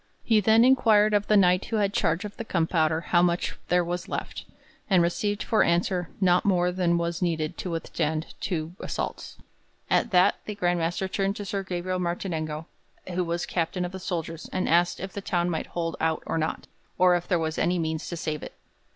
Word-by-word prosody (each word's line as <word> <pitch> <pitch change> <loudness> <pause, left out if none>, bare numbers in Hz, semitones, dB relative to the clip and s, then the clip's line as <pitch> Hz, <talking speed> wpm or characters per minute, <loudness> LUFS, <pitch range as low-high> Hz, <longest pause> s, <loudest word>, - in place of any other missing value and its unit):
He 225 -2 +4
then 220 +3 +5
inquired 220 -5 +5
of 205 0 +2
the 210 - +5
Knight 180 -1 +4
who 225 - -3
had 205 -2 +1
charge 165 +3 +1
of 205 - -7
the - - -5
gunpowder 165 -4 +1
how 175 - +6
much 175 0 +1
there 180 0 +3
was 175 +1 -3
left, - - -5 0.4
and 185 -3 +5
received 205 +4 -1
for 220 - +2
answer 175 0 +1
'not 180 -2 +3
more 180 -2 +2
than 175 -2 +1
was 170 0 -2
needed 160 -3 -1
to 185 - -4
withstand 160 -1 -2
two 165 -3 -3
assaults.' - - -5 0.5
At 235 - +3
that 180 -3 +4
the 210 - -5
Grand 175 -3 +1
Master 175 +3 -1
turned 195 +1 -1
to 205 - -6
Sir 195 0 -2
Gabriel 185 0 -3
Martinengo, 165 -3 -3 0.5
who 180 +1 0
was 170 0 -2
Captain 180 +1 -1
of 175 - -5
the 190 - -7
soldiers, 165 -2 -4
and 185 - -1
asked 175 +1 +3
if 190 +1 -6
the 200 - -5
town 175 -2 0
might 160 - -3
hold 165 -1 -3
out 160 -1 0
or 165 - -1
not, 155 - -2 0.3
or 180 0 +5
if 175 0 -3
there 180 - +2
were 160 -1 -1
any 180 +2 +2
means 160 -1 -2
to 170 - -4
save 155 -2 -3
it. - - -8
175 Hz, 205 wpm, -26 LUFS, 165-195 Hz, 0.5 s, how